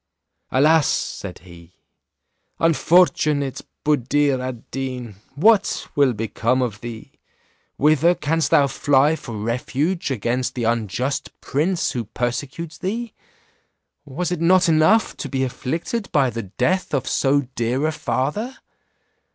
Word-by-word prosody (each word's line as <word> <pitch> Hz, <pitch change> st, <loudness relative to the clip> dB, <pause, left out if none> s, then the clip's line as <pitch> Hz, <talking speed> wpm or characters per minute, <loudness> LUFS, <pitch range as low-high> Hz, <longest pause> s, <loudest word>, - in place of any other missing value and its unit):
"Alas!" 150 Hz, +2 st, +4 dB
said -, -, -3 dB
he, 85 Hz, -1 st, -15 dB, 0.8 s
"unfortunate 155 Hz, -4 st, +2 dB, 0.2 s
Buddir 145 Hz, -1 st, +2 dB
ad 130 Hz, -3 st, -7 dB
Deen, 125 Hz, -6 st, -5 dB, 0.2 s
what 205 Hz, +6 st, +3 dB
will 140 Hz, -3 st, +4 dB
become 115 Hz, +3 st, 0 dB
of 105 Hz, -4 st, -4 dB
thee? 115 Hz, -2 st, -8 dB, 0.7 s
Whither 155 Hz, +4 st, +4 dB
canst 160 Hz, +1 st, 0 dB
thou 140 Hz, -, +5 dB
fly 140 Hz, +2 st, +2 dB
for 115 Hz, -8 st, -8 dB
refuge 135 Hz, -, -1 dB
against 125 Hz, 0 st, -1 dB
the 120 Hz, -, -2 dB
unjust 115 Hz, +4 st, -2 dB
prince 165 Hz, +6 st, 0 dB
who 120 Hz, -2 st, -3 dB
persecutes 135 Hz, +8 st, -4 dB
thee? 225 Hz, +4 st, -3 dB, 0.9 s
Was 170 Hz, +6 st, -4 dB
it 175 Hz, -2 st, -2 dB
not 180 Hz, +1 st, +4 dB
enough 165 Hz, +8 st, +3 dB
to 140 Hz, -, -5 dB
be 135 Hz, 0 st, -1 dB
afflicted 165 Hz, -, -3 dB
by 135 Hz, -4 st, +2 dB
the 115 Hz, -, -4 dB, 0.2 s
death 180 Hz, +5 st, +1 dB
of 135 Hz, -, -2 dB
so 140 Hz, +1 st, +2 dB
dear 120 Hz, +5 st, 0 dB
a 155 Hz, -, +1 dB
father? 150 Hz, -, -2 dB
140 Hz, 125 wpm, -21 LUFS, 125-165 Hz, 0.9 s, thou